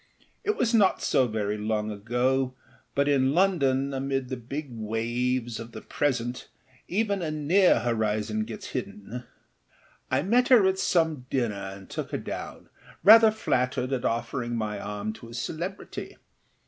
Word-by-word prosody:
It 425 - +1
was 240 -1 +1
not 205 -4 +4
so 130 - +3
very 105 -1 -2
long 105 0 -1
ago, 125 +5 0 0.4
but 140 0 +2
in 135 0 +3
London, 140 -8 +2
amid 135 -1 -2
the 130 - -2
big 135 +4 -6
waves 120 +2 -2
of 115 +1 -9
the 110 - -7
present, 125 -3 -2 0.4
even 200 0 0
a 165 - -2
near 155 0 +3
horizon 110 -2 0
gets - - -7
hidden. 120 +4 -6 0.8
I 130 +2 +1
met 245 +7 +3
her 240 -7 +6
at 190 0 +2
some 160 -9 +1
dinner 120 -5 0 0.2
and 95 -1 -13
took - - -5
her - - -2
down, - - -7 0.3
rather 220 +3 +9
flattered 130 -10 0
at 125 - -1
offering 120 +1 -1
my 105 -2 -2
arm 105 +1 -4
to 115 +1 -12
a 115 - -9
celebrity. 170 +10 -5
130 Hz, 150 wpm, -27 LUFS, 115-155 Hz, 0.8 s, rather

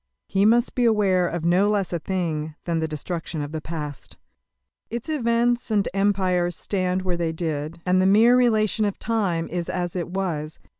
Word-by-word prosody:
He 195 +1 +3
must 235 +2 +3
be 250 - 0
aware 200 -6 +3
of 170 -1 -3
no 185 +4 +3
less 200 -4 0
a 170 - -1
thing 160 -3 -3
than 170 -2 -1
the 160 - -1
destruction 160 0 -4
of 145 - -6
the 160 -1 -4
past. 150 -3 -7 0.7
Its 235 +6 -5
events 240 -4 +1
and 210 -3 +1
empires 185 -3 +1
stand 185 -1 -1
where 180 -2 -1
they 170 -1 -1
did, 160 -1 -4
and 185 0 +3
the 190 - +3
mere 225 +5 +6
relation 220 -3 +2
of 205 - -2
time 195 -8 -1
is 175 -1 -3
as 175 -1 -3
it 175 -2 -2
was. 165 -5 -3
185 Hz, 185 wpm, -24 LUFS, 165-210 Hz, 0.7 s, mere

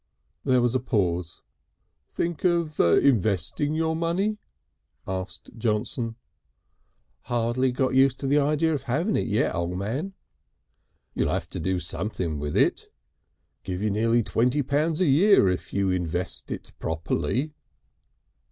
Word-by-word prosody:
There 125 -2 +3
was 120 -1 +2
a 130 - +2
pause. 90 -8 -1 0.7
"Think 170 -3 -3
of 170 -4 +1
investing 110 - +2
your 160 0 0
money?" 185 +6 0 0.7
asked 95 0 -5
Johnson. 115 +1 -1 1.1
"Hardly 120 +2 +1
got 130 +1 0
used 130 0 +4
to - - -3
the 145 +2 +3
idea 150 +3 +2
of 145 - -2
having 155 - 0
it - - 0
yet, 105 -1 +1
O' 85 0 -1
Man." 110 - -3 1.0
"You'll - - 0
have - - -2
to - - -4
do 95 -1 0
something 85 -2 -3
with 75 0 -2
it. - - +1 0.7
Give 90 +1 -4
you 105 - +1
nearly 115 +3 +2
twenty 125 +7 +1
pounds 155 +5 0
a - - +4
year 165 - +5
if 90 - -3
you 100 -1 +1
invest 90 0 -2
it - - -6
properly." 105 - -2
120 Hz, 135 wpm, -26 LUFS, 95-150 Hz, 1.1 s, year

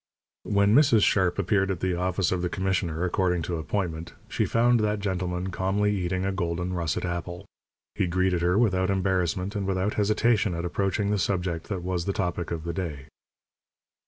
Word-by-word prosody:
When 100 0 +3
Mrs. 125 -6 +5
Sharp 95 -3 +2
appeared 95 0 +1
at 95 -3 -2
the 95 0 0
office 90 +1 0
of 90 -1 0
the 90 - -1
commissioner, 90 -3 -1
according 90 -1 0
to 85 +1 -2
appointment, 80 -1 -3 0.2
she - - 0
found 120 +1 +3
that 105 -1 +1
gentleman 95 -2 -2
calmly 100 +3 0
eating 95 0 -1
a 95 - 0
golden 90 -1 -2
russet 85 -2 -1
apple. 85 +2 -4 0.5
He - - 0
greeted 90 0 +1
her 90 +2 +2
without 95 -5 +2
embarrassment 95 0 0
and 100 -2 -2
without 95 +2 0
hesitation 105 -1 +2
at 85 +1 -3
approaching 100 +3 0
the 105 - +1
subject 90 -3 -1
that 95 -4 -3
was 90 -2 -2
the 100 - -1
topic 90 -4 -2
of 85 -2 -4
the 85 0 -3
day. 80 -6 -5
95 Hz, 180 wpm, -26 LUFS, 85-100 Hz, 0.5 s, Mrs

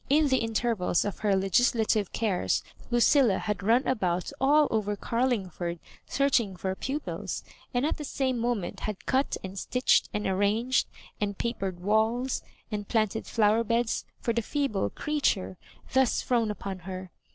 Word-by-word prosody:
In 295 +1 +4
the 260 - +3
in 225 -1 -3
tervals 215 -7 +1
of 205 - -4
her 205 -2 +2
legislative 215 +1 +2
cares 210 -5 0 0.3
Lucilla 240 -2 +4
had 210 -2 -2
run 230 +6 +3
about 185 -8 0
all 295 +2 +5
over 210 -2 0
Garlingford 195 -8 -1 0.3
searching 250 -8 +2
for 190 +1 -2
pupils* 275 +9 -4 0.3
and 245 +2 +1
at 310 - 0
the 300 - -5
same 265 -3 -1
moment 235 -6 -2
had 210 -2 -5
cut 265 +2 +1
and 190 +1 -5
stitched 250 +5 +2
and 210 0 -2
arranged, 205 +6 +2 0.3
and 200 -1 -1
papered 195 -6 -3
walls, 220 +6 +1 0.3
and 205 -1 -3
planted 220 -1 0
flower 220 0 +3
beds, 230 0 0 0.2
for 235 - -1
the 235 - +1
feeble 270 -5 -1
creature 275 - -1 0.3
thus 265 -2 +3
thrown 235 -3 +1
upon 195 -2 -5
her. 185 0 -7
220 Hz, 150 wpm, -28 LUFS, 195-250 Hz, 0.3 s, all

